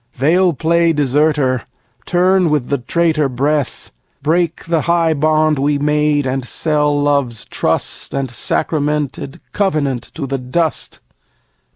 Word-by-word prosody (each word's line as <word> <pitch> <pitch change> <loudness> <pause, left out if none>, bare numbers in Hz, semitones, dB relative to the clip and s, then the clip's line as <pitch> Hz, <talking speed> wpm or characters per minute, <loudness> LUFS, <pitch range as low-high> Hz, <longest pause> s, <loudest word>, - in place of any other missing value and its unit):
They'll 170 +7 +3
play 165 +3 +2
deserter, 145 -2 +1 0.5
turn 180 0 +3
with 150 -5 0
the 140 -1 0
traitor 155 +2 +1
breath, 140 +2 -2 0.3
Break 165 +2 0
the 165 -1 +1
high 170 -1 +2
bond 155 0 +2
we 145 +1 +1
made, 150 0 +1
and 130 0 -2
sell 150 +2 0
Love's 140 -6 0
trust - - -2
And 135 -1 -2
sacramented 145 +1 -2
covenant 150 -11 0
to 150 - -4
the 135 0 -3
dust. 145 +5 -2
150 Hz, 120 wpm, -17 LUFS, 140-160 Hz, 0.5 s, They'll